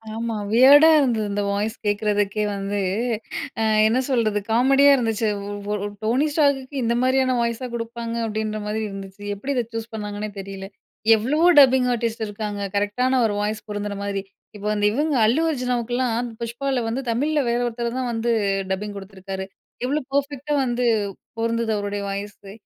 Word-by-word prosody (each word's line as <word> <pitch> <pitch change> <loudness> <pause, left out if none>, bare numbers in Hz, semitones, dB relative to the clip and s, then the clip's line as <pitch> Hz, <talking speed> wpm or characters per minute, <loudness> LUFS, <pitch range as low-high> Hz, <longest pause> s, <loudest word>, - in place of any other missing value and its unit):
ஆமா. 230 0 -3 0.2
வியர்டா 280 +7 +8
இருந்தது. 235 -6 +1
இந்த 205 0 -1
வாய்ஸ் 210 +2 -1
கேக்குறதுக்கே 205 0 0
வந்து, 200 +1 -2 0.8
ஆ - - +2 0.2
என்ன 235 +4 +2
சொல்றது? 220 -5 +1
காமெடியா 270 +4 +5
இருந்துச்சு. 225 -2 0 0.2
ஒ - - -4 0.2
ஒரு 205 0 -2 0.2
"டோனி 250 +7 +2
ஸ்டார்க்க்கு 280 -2 +1
இந்த 235 0 +1
மாதிரியான 260 0 +2
வாய்ஸா 235 +2 -2
குடுப்பாங்க." 230 0 -5
அப்பிடின்ற 215 0 -3
மாதிரி 215 +1 -2
இருநதுச்சு. 195 0 -9
எப்பிடி 270 +8 -3
இதை 245 - +1
சூஸ் 225 0 -5
பண்ணாங்கன்னே 210 -1 -4
தெரியல. 195 0 -7 0.5
எவ்வளவோ 290 +10 +2
டப்பிங் 260 -2 +6
ஆர்டிஸ்ட் 230 -1 -2
இருக்காங்க, 205 0 -5
கரெக்ட்டான 250 +6 +1
ஒரு 215 - 0
வாய்ஸ் 210 +1 -3
பொருந்துற 205 0 -3
மாரி. 200 -1 -2 0.3
இப்போ 210 0 -5
வந்து, 205 -1 0
இவுங்க 295 +4 0
அல்லு 240 +9 +3
அர்ஜுனாவுக்கு 245 -3 -2
எல்லாம் 245 -1 0
புஷ்பாவுல 245 +3 -2
வந்து, 245 +4 -2
தமிழ்ல 295 +6 +1
வேற 235 +1 +1
ஒருத்தர் 235 +1 -3
தான் 250 -2 -2
வந்து, 230 +1 0 0.4
டப்பிங் 205 +2 -3
கொடுத்துருக்காரு. 195 -1 -7 0.4
எவ்வளோ 290 +4 0
பெர்ஃபெக்ட்டா 285 +1 -1
வந்து 245 0 -1 0.6
பொருந்துது, 230 0 0
அவருடைய 205 0 -3
வாய்ஸு. 200 0 -7
230 Hz, 155 wpm, -23 LUFS, 205-255 Hz, 0.8 s, வியர்டா